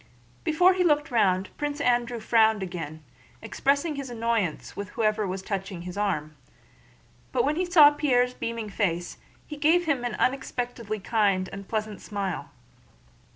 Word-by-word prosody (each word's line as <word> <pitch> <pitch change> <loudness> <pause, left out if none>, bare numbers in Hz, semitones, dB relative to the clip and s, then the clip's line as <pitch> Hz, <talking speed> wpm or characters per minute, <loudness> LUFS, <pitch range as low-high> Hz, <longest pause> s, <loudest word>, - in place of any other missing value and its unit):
Before 355 +4 +4
he 365 0 +1
looked 295 -3 +2
round 190 -5 +1
Prince 290 0 -3
Andrew 240 -2 +1
frowned 220 -2 +3
again, 165 -4 -6 0.4
expressing 280 +6 0
his 275 -2 -5
annoyance 230 -7 -2
with 200 -2 -5
whoever 215 -1 0
was 190 +1 -4
touching 195 -3 -4
his 180 +1 -7
arm, 155 -7 -2 1.0
but 480 - +1
when 300 - +1
he 365 +3 0
saw 320 -5 +7
Pierre's 250 -4 +2
beaming 230 -3 -4
face 175 -4 -2 0.3
he 300 - -8
gave 325 +4 +3
him 280 -6 0
an 240 -3 -2
unexpectedly 245 -4 -2
kind 200 -3 +1
and 200 0 -8
pleasant 215 -3 -3
smile. 195 -4 -4
225 Hz, 150 wpm, -26 LUFS, 195-280 Hz, 1.0 s, saw